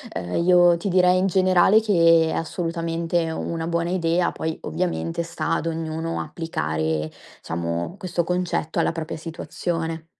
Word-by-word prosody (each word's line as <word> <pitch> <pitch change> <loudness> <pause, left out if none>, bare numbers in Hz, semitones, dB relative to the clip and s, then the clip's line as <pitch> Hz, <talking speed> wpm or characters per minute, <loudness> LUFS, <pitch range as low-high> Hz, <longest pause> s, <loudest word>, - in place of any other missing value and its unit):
uhm, 90 0 -4
io 175 -1 +6
ti 170 - -4
direi 180 -1 +4
in 185 - +2
generale 185 +2 +4
che 165 -6 +4
è - - -2
assolutamente 165 0 -2
è 165 - -3
una 165 0 -3
buona 170 0 -1
idea, 175 -1 +1
poi 160 0 -3
ovviamente 170 -1 -2
sta 165 0 -3
ad 165 - -1
ognuno 165 0 -3
applicare, 80 - -2 0.3
diciamo, 85 - -3
questo 180 -3 -2
concetto 180 -2 -2
alla - - +2
propria 165 -1 -5
situazione. 165 0 -4
165 Hz, 145 wpm, -23 LUFS, 160-175 Hz, 0.3 s, io